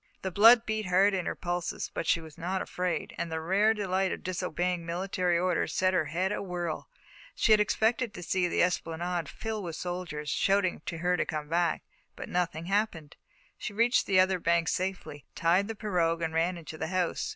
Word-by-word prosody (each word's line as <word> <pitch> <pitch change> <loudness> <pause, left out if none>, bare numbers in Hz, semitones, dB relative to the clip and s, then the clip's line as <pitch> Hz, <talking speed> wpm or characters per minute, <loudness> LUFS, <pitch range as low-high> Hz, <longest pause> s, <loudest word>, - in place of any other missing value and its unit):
The 190 - -2
blood 225 +6 +7
beat 215 -2 -2
hard 190 +3 +4
in 185 -2 -1
her - - -2
pulses, 175 -1 -3
but - - -3
she - - +3
was 160 -2 -11
not 185 +3 -2
afraid, 180 -1 -3
and 170 -1 -3
the 160 - -2
rare 195 +7 +3
delight 190 -3 0
of - - -5
disobeying 180 -1 -2
military 175 +1 0
orders 180 0 0
set 185 0 +2
her 175 -4 +2
head 180 +6 -1
awhirl. 175 -5 -3 0.5
She 225 - +4
expected 220 +2 +2
to 180 - -7
see 180 +1 +1
the - - +2
esplanade 170 -2 -1
fill 220 +5 -4
with 170 -4 -5
soldiers, 170 -5 -4
shouting 195 -4 +1
to 165 - -3
her 180 +2 +1
to - - 0
come 150 -2 -4
back, 170 0 +1 0.3
but - - -8
nothing 170 -2 -1
happened. 195 -6 -1 0.4
She 215 - -5
reached 235 +4 +2
the 190 -2 +4
other 185 0 +3
bank 170 -1 +2
safely, 180 - -3
tied 180 +4 +2
the 225 - -5
pirogue, 170 -6 0
and 160 -1 -2
ran 170 +2 +1
into 160 -1 -9
the 160 - -2
house. 180 0 -1
180 Hz, 195 wpm, -29 LUFS, 170-195 Hz, 0.5 s, blood